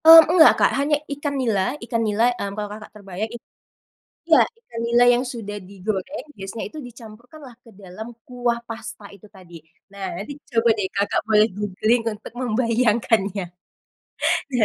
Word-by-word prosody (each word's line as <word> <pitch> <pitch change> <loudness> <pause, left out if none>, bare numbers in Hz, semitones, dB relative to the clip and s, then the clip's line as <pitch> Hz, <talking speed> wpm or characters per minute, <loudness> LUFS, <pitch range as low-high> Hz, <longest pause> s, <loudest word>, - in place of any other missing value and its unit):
Mmm, 325 0 +12
enggak 325 -3 +8
Kak - - +4
hanya 290 +2 +2 0.2
ikan 285 0 -3
nila 220 -6 +1 0.2
Ikan 230 -1 -1
nila, 210 +2 +1
hmm, 200 - -3
kalau 210 -1 -3
Kakak 215 0 -10
terbayang 200 +1 -5
it 235 - -9 0.9
iya, - - +6 0.2
ikan 235 - -8
nila 235 +1 +4
yang 245 +1 +1
sudah 205 -3 -6
digoreng 200 +8 -4
biasanya 195 +3 -6
itu 310 - -9
dicampurkan 240 +4 -13
lah 240 - -16
ke - - -15
dalam 195 +4 -9 0.2
kuah 245 -1 -1
pasta 225 -2 -8
itu 200 - -17
tadi. 180 -2 -15 0.4
Nah 200 -1 -6 0.2
nanti 220 +8 -7 0.2
coba 230 0 +3
deh 205 - -1
Kakak 200 +1 +1
boleh 215 0 +5
googling 210 +4 +1
untuk 210 +1 -11
membayangkannya. 225 -4 +1 1.1
Iya, 240 -3 +4
225 Hz, 160 wpm, -22 LUFS, 205-245 Hz, 1.1 s, Mmm